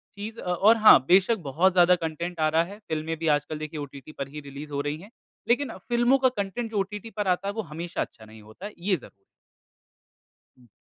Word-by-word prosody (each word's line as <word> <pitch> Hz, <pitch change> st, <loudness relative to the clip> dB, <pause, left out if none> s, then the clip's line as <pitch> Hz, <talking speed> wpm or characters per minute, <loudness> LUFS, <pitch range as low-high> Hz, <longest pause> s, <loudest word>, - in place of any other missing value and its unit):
चीज़ 215 Hz, +3 st, -7 dB
अ, -, -, -7 dB
और 215 Hz, +6 st, +5 dB
हाँ 215 Hz, -1 st, +8 dB
बेशक 195 Hz, +5 st, +4 dB
बहुत 180 Hz, +7 st, +3 dB
ज़्यादा 180 Hz, 0 st, +6 dB
कंटेंट 170 Hz, +2 st, -5 dB
आ 155 Hz, 0 st, +3 dB
रहा 160 Hz, +1 st, +3 dB
है। 200 Hz, +5 st, -10 dB
फ़िल्में 160 Hz, -4 st, -4 dB
भी 165 Hz, -, -3 dB
आजकल 150 Hz, +1 st, -7 dB
देखिए 155 Hz, 0 st, -6 dB
ओटीटी 140 Hz, +1 st, -9 dB
पर 140 Hz, -, -6 dB
ही 150 Hz, +2 st, -8 dB
रिलीज़ 145 Hz, +2 st, -9 dB
हो 140 Hz, 0 st, -1 dB
रही 145 Hz, +1 st, -3 dB
है। 200 Hz, -, -13 dB, 0.4 s
लेकिन 265 Hz, +4 st, +1 dB, 0.2 s
फ़िल्मों 240 Hz, +3 st, +4 dB
का 260 Hz, -, +6 dB
कंटेंट 225 Hz, +1 st, -4 dB
जो 205 Hz, -, 0 dB
ओटीटी 210 Hz, +3 st, -4 dB
पर 210 Hz, -2 st, -3 dB
आता 185 Hz, +2 st, +1 dB
है, 200 Hz, -, -2 dB
वो 220 Hz, -, -2 dB
हमेशा 170 Hz, +3 st, -4 dB
अच्छा 110 Hz, -, -7 dB
नहीं 110 Hz, 0 st, -14 dB
होता 110 Hz, -, -12 dB
है, 210 Hz, -, -6 dB
ये 190 Hz, +1 st, +1 dB
ज़ 145 Hz, -, -9 dB, 1.5 s
हुँ। 125 Hz, -1 st, -21 dB
175 Hz, 220 wpm, -26 LUFS, 155-210 Hz, 1.5 s, हाँ